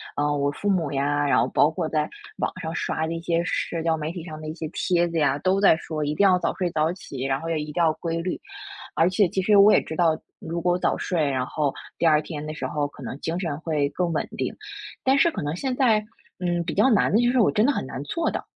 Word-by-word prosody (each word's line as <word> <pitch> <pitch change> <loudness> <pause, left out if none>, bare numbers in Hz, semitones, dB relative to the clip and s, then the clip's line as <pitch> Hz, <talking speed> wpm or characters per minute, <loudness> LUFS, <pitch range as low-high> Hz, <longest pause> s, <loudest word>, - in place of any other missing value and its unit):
啊， 145 0 +1
我 140 0 +1
父 205 - -5
母 180 -7 +1
呀， 145 +1 0
然 - - +3
后 - - +2
包 150 - +4
括 160 0 -3
在 155 -1 -1 0.3
网 - - -1
上 165 -2 -4
刷 160 -1 -1
的 160 - -3
一 165 - -4
些 170 0 0
社 170 -2 -2
交 165 -1 +2
媒 155 0 -4
体 175 -2 -7
上 155 -2 -8
的 155 - -7
一 - - -4
些 165 -2 -5
帖 175 -1 +1
子 165 -1 -2
呀， 140 -2 +2
都 190 +5 +1
在 195 -5 +6
说 155 -2 -4
一 150 +1 -1
定 200 - +2
要 180 -1 +4
早 170 - 0
睡 180 - -1
早 155 +1 +1
起， 140 -8 -8
然 135 0 0
后 165 - -6
也 165 -2 0
一 150 0 -5
定 - - -12
要 165 -2 +3
规 165 +1 -3
律。 180 +2 -3 0.6
而 165 - +4
且 185 +2 +3
其 190 - 0
实 205 +3 +4
我 200 +1 +8
也 - - +5
知 160 - -7
道， 160 -2 +3 0.2
如 170 +1 -4
果 175 +1 +1
早 - - 0
睡， 160 -6 0
然 130 -1 -1
后 145 -1 -1 0.3
第 - - +2
二 155 -2 +5
天 150 -1 -6
的 155 - -5
时 155 - -4
候 145 -1 -1
可 145 - -14
能 130 +2 -6
精 170 +2 -2
神 160 -6 -3
会 150 -4 0
更 175 +2 -1
稳 155 - -1
定。 - - -2 0.5
但 265 +1 +3
是 305 +5 +5
可 - - -5
能 145 +2 -2
现 260 +6 -2
在， 250 -5 +4 0.4
嗯， 175 -1 0
比 165 - -3
较 265 - +4
难 215 - +3
的 210 - +4
就 240 - +3
是 260 - +2
我 215 - +4
真 210 - +2
的 285 - +3
很 - - -3
难 130 - -6
做 335 - -1
到， - - -3
165 Hz, 300 characters per minute, -24 LUFS, 150-180 Hz, 0.6 s, 我